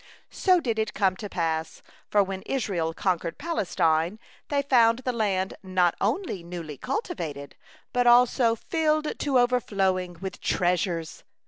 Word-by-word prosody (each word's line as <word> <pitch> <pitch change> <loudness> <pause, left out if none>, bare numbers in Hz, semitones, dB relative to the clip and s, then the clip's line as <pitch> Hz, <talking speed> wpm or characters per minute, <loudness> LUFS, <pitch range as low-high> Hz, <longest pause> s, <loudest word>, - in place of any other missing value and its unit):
So 370 -2 +3
did 230 -8 -2
it 220 -1 -2
come 190 -2 +2
to 205 - -6
pass, 160 -2 -2 0.3
for 205 -1 +4
when 190 0 -5
Israel 195 -11 -1
conquered 170 -1 -1
Palestine, 180 - 0 0.3
they 280 -1 +1
found 240 -2 +4
the 255 - +1
land 195 -5 0
not 185 -2 +2
only 355 - -1
newly 170 -4 -7
cultivated, 155 - -4 0.4
but 245 0 +2
also 240 -1 +5
filled 310 +4 -1
to 280 -3 +1
overflowing 195 -8 +1
with 190 +1 -6
treasures. 175 -2 -1
195 Hz, 135 wpm, -26 LUFS, 175-250 Hz, 0.4 s, also